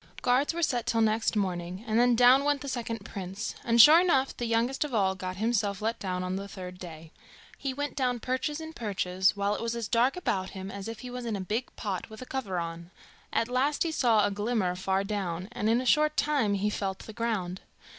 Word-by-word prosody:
Guards 255 +3 +3
were 340 +1 -3
set 245 -5 0
till 230 -2 +2
next 220 +1 +1
morning, 185 -1 -2
and 220 0 +1
then 245 0 +4
down 250 +3 +6
went 290 -1 +1
the 285 - -6
second 230 -5 -4
prince, 195 +2 -5
and 235 0 +2
sure 310 +8 +10
enough, 275 -7 +2
the 240 - -3
youngest 235 +5 +1
of 290 -5 -4
all 190 -3 +2
got 185 0 -5
himself 205 -2 0
let 225 +2 -2
down 185 -2 -3
on 185 +1 -2
the 200 +1 -5
third 180 -2 -8
day. 160 -3 -10 0.5
He 275 - -2
went 290 +2 -4
down 250 -3 0
perches 260 +6 -2
and 320 0 -8
perches, 190 -3 0
while 200 +1 +1
it - - -4
was 230 0 -2
as 230 -3 -3
dark 245 - +2
about 190 - -1
him 190 +1 -6
as 200 0 -7
if 225 -1 -7
he 250 - -7
was 250 -1 -5
in 220 - -1
a - - -3
big 215 +6 -2
pot 195 -4 -4
with 220 0 -11
a 255 - -7
cover 250 -9 -3
on. 170 0 -5 0.4
At 230 - +1
last 265 +4 +1
he 335 - -1
saw 230 -8 +3
a 205 - 0
glimmer 205 -3 0
far 190 +1 0
down, 190 -3 -3
and 220 -3 -1
in 230 +2 +3
a 255 - -3
short 305 +3 +3
time 270 -9 +2
he 205 +2 0
felt 195 -2 -3
the 220 - -9
ground. 210 -6 -2
225 Hz, 235 wpm, -28 LUFS, 190-250 Hz, 0.5 s, sure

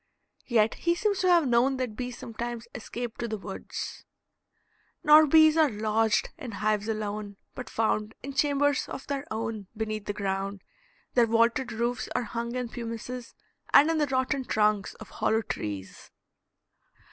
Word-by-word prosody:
Yet 225 -2 +3
he 340 0 0
seems 405 +1 0
to 370 - +2
have 340 -5 +5
known 250 +3 +3
that 250 -4 -3
bees 245 +1 -5
sometimes 235 0 -5
escaped 240 0 -6
to 235 - -2
the 220 -1 -3
woods: 195 -1 -6 1.0
"Nor 305 +1 +8
bees 315 +1 +6
are 315 -2 +5
lodged 215 0 +1
in 250 -8 -7
hives 210 +1 0
alone, 210 -2 -3 0.2
but 255 - -7
found 215 -1 0
In 275 +1 -5
chambers 285 0 +2
of 265 - -6
their 280 -1 -4
own 220 -2 -4
beneath 215 -1 -3
the 205 - -2
ground: 195 -1 -3 0.5
Their 240 -2 +4
vaulted 230 +2 +2
roofs 235 +2 -2
are 250 - +1
hung 235 +2 -4
in 250 -2 -2
pumices, 235 +1 -6 0.4
And 300 +3 +8
in 320 - 0
the 295 - +2
rotten 260 +1 0
trunks 210 -4 +1
of 215 - -12
hollow 225 +1 +1
trees." 100 - -6
235 Hz, 160 wpm, -28 LUFS, 215-265 Hz, 1.0 s, Nor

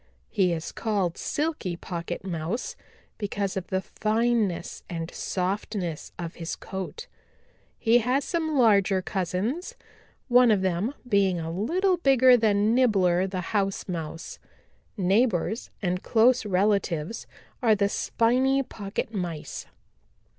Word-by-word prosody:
He 185 -3 +2
is 160 -2 -3
called 200 -6 -1
Silky 300 - -2
Pocket 170 0 -5
Mouse 175 +6 -3 0.4
because 200 -2 -2
of 190 -2 -4
the 190 0 -1
fineness 220 -3 0
and 165 -1 -5
softness 185 -3 -3
of 170 -2 -5
his 165 -1 -5
coat. 190 - -6 0.7
He 230 +2 +4
has 250 +4 +1
some 315 -3 -1
larger 200 -5 +4
cousins, 210 - -2 0.5
one 250 -1 +6
of 205 -3 +3
them 190 +9 0
being 195 -5 +2
a 165 0 -4
little 355 - +1
bigger 260 -5 +6
than 215 -1 +3
Nibbler 190 -7 +3
the 185 -1 -3
House 195 -2 0
Mouse. 165 -2 -5 0.6
Neighbors 205 +2 +1
and 180 0 0
close 235 0 +3
relatives 195 -2 0 0.3
are 225 -3 +4
the 200 -1 +2
Spiny 255 +6 +2
Pocket 210 -1 -5
Mice." 175 -6 -4
200 Hz, 120 wpm, -26 LUFS, 180-240 Hz, 0.7 s, one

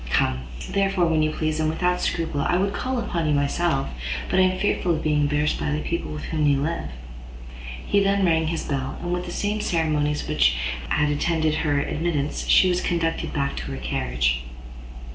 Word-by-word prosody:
Come, 65 +1 +1 0.3
therefore, 195 -2 +2
when 160 -2 +2
you 155 - +2
please, 155 0 -2
and 155 0 +1
without 180 +2 0
scruple. 160 -4 -1
I 175 - +2
would 195 +2 0
call 260 +3 -2
upon 170 -8 -1
you 150 - +2
myself, 145 0 +1 0.4
but 190 - +3
am 185 0 +3
fearful 185 -3 +1
of 155 - -4
being 150 -1 +2
embarrassed 150 +1 +1
by - - -1
the 150 0 0
people 170 +2 -3
with 150 0 -6
whom 155 -2 0
you 140 -1 +3
live." 165 +4 -2 1.0
He 205 - +3
then 195 0 +2
rang 160 -2 +2
his 165 0 -2
bell, 135 -2 -3
and 175 0 -3
with 180 0 -3
the - - -5
same 210 +3 -1
ceremonies 150 -5 0
which - - +3 0.3
had 150 -1 +2
attended 155 +1 +1
her 145 -3 +1
admittance, 150 -1 -2
she 185 - +6
was 180 0 +1
conducted 165 -1 -1
back 140 -2 -1
to - - -4
her 65 - -4
carriage. - - 0
160 Hz, 195 wpm, -24 LUFS, 145-175 Hz, 1.0 s, she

